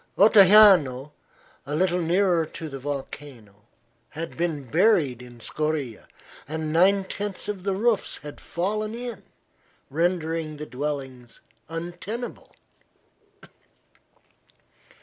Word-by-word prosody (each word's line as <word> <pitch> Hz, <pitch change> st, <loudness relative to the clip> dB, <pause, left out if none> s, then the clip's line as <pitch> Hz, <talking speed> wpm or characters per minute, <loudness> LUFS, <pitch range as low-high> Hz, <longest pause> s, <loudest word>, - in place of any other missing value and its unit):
Ottajano, 190 Hz, -, +6 dB, 0.5 s
a 145 Hz, +2 st, -4 dB
little 180 Hz, +1 st, +1 dB
nearer 175 Hz, 0 st, +2 dB
to 160 Hz, -, -7 dB
the 135 Hz, -1 st, -7 dB
volcano, 130 Hz, -6 st, -8 dB, 0.4 s
had 165 Hz, +2 st, -6 dB
been 165 Hz, -4 st, -2 dB
buried 155 Hz, -, +2 dB
in 120 Hz, -1 st, -13 dB
scoria, 150 Hz, -2 st, -3 dB, 0.4 s
and 155 Hz, +1 st, -3 dB
nine 195 Hz, +4 st, +4 dB
tenths 200 Hz, 0 st, -5 dB
of 205 Hz, -3 st, -4 dB
the 195 Hz, 0 st, -1 dB
roofs 220 Hz, +1 st, 0 dB
had 145 Hz, 0 st, -9 dB
fallen 215 Hz, +5 st, -2 dB
in, 235 Hz, -4 st, -6 dB, 0.7 s
rendering 165 Hz, -1 st, -1 dB
the 150 Hz, -, -6 dB
dwellings 135 Hz, -4 st, -5 dB, 0.3 s
untenable. 175 Hz, +8 st, -6 dB
165 Hz, 100 wpm, -25 LUFS, 145-195 Hz, 0.7 s, Ottajano